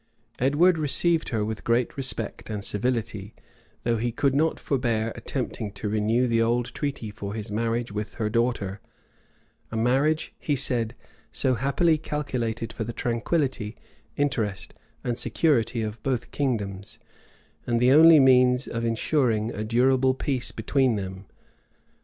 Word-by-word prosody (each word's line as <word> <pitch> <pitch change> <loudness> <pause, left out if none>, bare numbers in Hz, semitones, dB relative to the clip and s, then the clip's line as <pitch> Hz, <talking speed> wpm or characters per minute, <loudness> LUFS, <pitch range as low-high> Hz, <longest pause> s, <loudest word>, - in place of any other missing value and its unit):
Edward 160 +7 +3
received 160 +3 +2
her 110 -4 -1
with 110 0 -5
great 120 +1 +1
respect 130 -7 -4
and 105 -2 -3
civility; 110 -2 -2 0.5
though 115 -1 +1
he 120 +2 -1
could 135 +3 +1
not 155 +3 +1
forbear 115 -4 -1
attempting 105 -2 -4
to 105 +1 -5
renew 110 +4 +1
the 115 -2 +2
old 120 +1 0
treaty 140 -7 -4
for 100 0 -6
his 110 -1 -6
marriage 115 +1 -1
with 105 0 -5
her 110 - -1
daughter; 105 -4 -1 0.9
a 115 - -3
marriage, 135 +7 +1
he 145 - 0
said, 120 -4 0 0.4
so 130 - +1
happily 150 +6 +2
calculated 120 -7 -3
for 110 - -4
the 115 +2 -5
tranquillity, 120 -2 -1 0.4
interest, 110 -8 -1 0.3
and 120 -1 -2
security 120 -7 +1
of 110 0 -5
both 130 -3 -2
kingdoms, 100 -8 -3 0.7
and 120 -1 +1
the 125 +2 +4
only 160 +2 +8
means 125 -1 +5
of 115 0 -3
insuring 115 -1 +1
a 105 - -4
durable 130 +3 +3
peace 130 -2 0
between 130 +2 +1
them. 95 -1 -6
120 Hz, 140 wpm, -25 LUFS, 110-135 Hz, 0.9 s, only